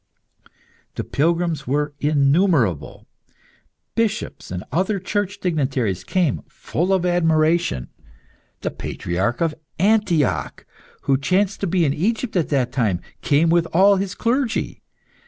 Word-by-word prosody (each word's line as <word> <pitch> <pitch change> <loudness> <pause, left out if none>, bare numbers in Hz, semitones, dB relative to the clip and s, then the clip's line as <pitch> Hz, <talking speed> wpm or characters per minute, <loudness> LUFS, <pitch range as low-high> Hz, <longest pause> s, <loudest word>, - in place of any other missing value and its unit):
The - - -3
pilgrims 165 -1 0
were 145 +2 0
innumerable. 145 - +2 0.9
Bishops 225 -2 -2
and 90 0 -5
other 190 +7 +1
Church 200 +1 -2
dignitaries, 130 - -1
came, 180 -6 0
full 175 +5 -2
of 190 -2 +2
admiration. 165 - +2 0.7
The - - -2
Patriarch 95 - -3
of 165 -2 +1 0.2
Antioch, 190 -7 +1 0.4
who 135 -1 +2
chanced 190 +6 +1
to 200 - -1
be 175 -1 +2
in 140 - +1
Egypt 220 - -1
at 170 -4 +1
that 130 -4 +1
time, 110 -9 0 0.2
came 155 +3 +3
with 170 0 +3
all 195 +3 +5
his 195 0 -3
clergy. 240 0 -1
165 Hz, 120 wpm, -21 LUFS, 140-190 Hz, 0.9 s, all